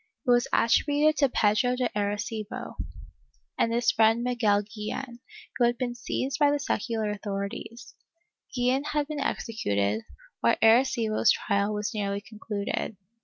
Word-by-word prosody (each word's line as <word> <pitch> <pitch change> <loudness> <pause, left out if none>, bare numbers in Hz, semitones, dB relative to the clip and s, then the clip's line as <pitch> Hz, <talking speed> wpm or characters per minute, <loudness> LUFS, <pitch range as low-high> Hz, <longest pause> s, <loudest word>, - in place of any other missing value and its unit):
It 250 - +3
was 240 0 +4
attributed 295 +6 +3
to 280 -2 +3
Pedro 245 +3 +2
de 250 -1 0
Arreeibo 210 +1 -3 0.8
and 230 - +1
his 235 +1 +2
friend 225 +1 +3
Miguel 225 -5 +2
Guillen, 220 +4 -6 0.4
who 245 - +3
had 240 0 +2
l;)een 245 -2 -1
seized 265 +3 -3
by 290 -1 +5
the 290 - +2
secular 230 -6 -2
authorities; 200 +3 -6 0.6
Guillen 250 +2 +1
had 295 -1 0
been 305 -1 -4
executed, 105 - -1 0.4
while - - +3
Arrecibo's 225 -1 +3
trial 200 0 +1
was 210 0 -2
nearly 200 -2 -2
concluded. 210 -1 -4
225 Hz, 135 wpm, -27 LUFS, 210-250 Hz, 0.8 s, by